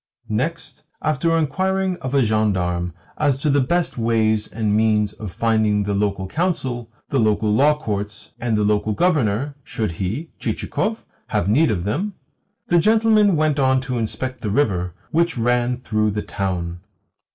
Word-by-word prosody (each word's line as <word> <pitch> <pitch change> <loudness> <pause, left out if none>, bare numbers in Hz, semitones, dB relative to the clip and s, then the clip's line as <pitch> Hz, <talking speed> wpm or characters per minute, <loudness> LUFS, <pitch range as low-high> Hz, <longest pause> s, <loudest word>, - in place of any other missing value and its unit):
Next, - - -3 0.2
after 155 +2 +1
inquiring 190 +5 0
of 130 -2 -4
a 135 - +5
gendarme 95 -6 0 0.3
as 145 -3 +2
to 145 +2 0
the 140 0 +3
best 170 0 0
ways 110 -2 +2
and 110 -2 0
means 105 -1 +2
of 105 -4 -7
finding 110 -1 +1
the 100 0 -1
local 100 -1 0
council, 130 - -2 0.2
the 135 - +1
local 110 -1 +2
law 150 +6 +4
courts, 105 -6 -5
and 115 -3 0
the 105 - +2
local 105 +1 +1
Governor, 140 - +1
should 110 -6 -2
he 100 - -4
(Chichikov) - - -2 0.2
have 85 - 0
need 145 +10 +4
of 90 -5 -1
them, 180 - -2 0.5
the 175 - +4
gentleman 215 0 +4
went 155 -2 +1
on 130 -1 +3
to 130 -2 -3
inspect 130 +3 -4
the 105 - -2
river 95 -8 0 0.2
which 170 -2 +1
ran 120 +1 +1
through 110 -4 0
the 105 0 -2
town. 90 -3 -3
115 Hz, 160 wpm, -21 LUFS, 105-150 Hz, 0.5 s, a